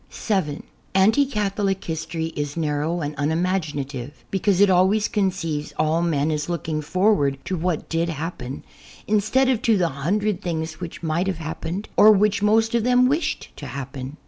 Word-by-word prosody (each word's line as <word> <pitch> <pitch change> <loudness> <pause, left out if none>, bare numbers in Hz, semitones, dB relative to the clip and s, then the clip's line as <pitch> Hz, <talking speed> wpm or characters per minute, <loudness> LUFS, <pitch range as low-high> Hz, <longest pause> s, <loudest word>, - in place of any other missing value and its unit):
(7) 185 -9 -2 0.3
Anti 220 +9 +4
Catholic 200 -4 -1
history 160 0 -3
is 145 +1 -3
narrow 155 +2 -1
and 145 0 -3
unimagina 155 -1 -1
tive, 135 +1 -8
because 195 -1 +1
it 205 - +7
always 190 +4 +3
conceives 180 -7 -2
all 155 +2 +2
men 160 -3 +1
as 150 +1 -2
looking 160 -3 -2
for 185 +8 +2
ward 140 -6 0
to 190 - -2
what 170 -1 -2
did 165 +1 0
happen, 150 -4 -5 0.4
instead 215 +6 +2
of 255 -4 +1
to 225 -3 +3
the 175 -3 +2
hundred 185 +8 -1
things 160 -3 -3
which 175 -1 -7
might 165 +3 0
have 190 -3 -1
happened, 165 +5 -5
or 215 - +9
which 210 0 +3
most 225 +2 +3
of 235 -2 +2
them 250 +1 +4
wished 300 +2 -1
to 145 - -7
happen. 135 +1 -6
170 Hz, 170 wpm, -23 LUFS, 155-205 Hz, 0.4 s, or